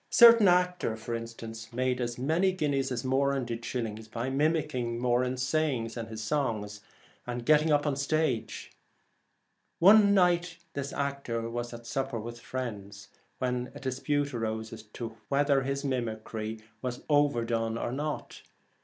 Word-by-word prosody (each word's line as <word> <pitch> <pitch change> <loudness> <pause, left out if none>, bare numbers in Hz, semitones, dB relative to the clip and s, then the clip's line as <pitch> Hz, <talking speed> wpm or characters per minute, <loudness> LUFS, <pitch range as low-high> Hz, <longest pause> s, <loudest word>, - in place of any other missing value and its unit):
A - - -12
certain 230 -3 +9
actor, 180 -9 +2
for 110 +1 -5
instance, 115 -1 -7
made 125 +1 0
as 120 0 -2
many 160 +9 +2
guineas 140 -6 0
as 125 +1 -3
Moran 135 0 +1
did 120 0 -5
shillings 110 -3 -4
by 115 +4 -3
mimick 155 +2 +1
ing 120 -2 -2
his 125 +1 +1
sayings 130 -6 0
and 115 -2 -4
his 110 0 -6
songs 110 -7 -1 0.5
and 120 0 -3
his - - -13
get 155 +2 +5
up 145 -1 +4
upon 145 -1 0
the 135 - -4
stage. 140 -7 -1 1.1
One 200 +2 +7
night 175 -2 +3 0.2
this 140 0 -4
actor 140 -5 -2
was 120 0 -3
at 120 -1 -9
supper 135 0 -2
with 120 +2 -7
some - - -17
friends, 105 -5 -6 0.3
when 125 -1 -2
dispute 140 +2 -1
arose 110 -1 -3
as 115 - -8
to 115 +1 -8
whether 140 0 +3
his 140 +1 -2
mimicry 110 -3 -3 0.2
was 125 -1 -4
overdone 115 -6 +2
or 120 - -2
not. 145 +3 -4
125 Hz, 160 wpm, -29 LUFS, 115-145 Hz, 1.1 s, certain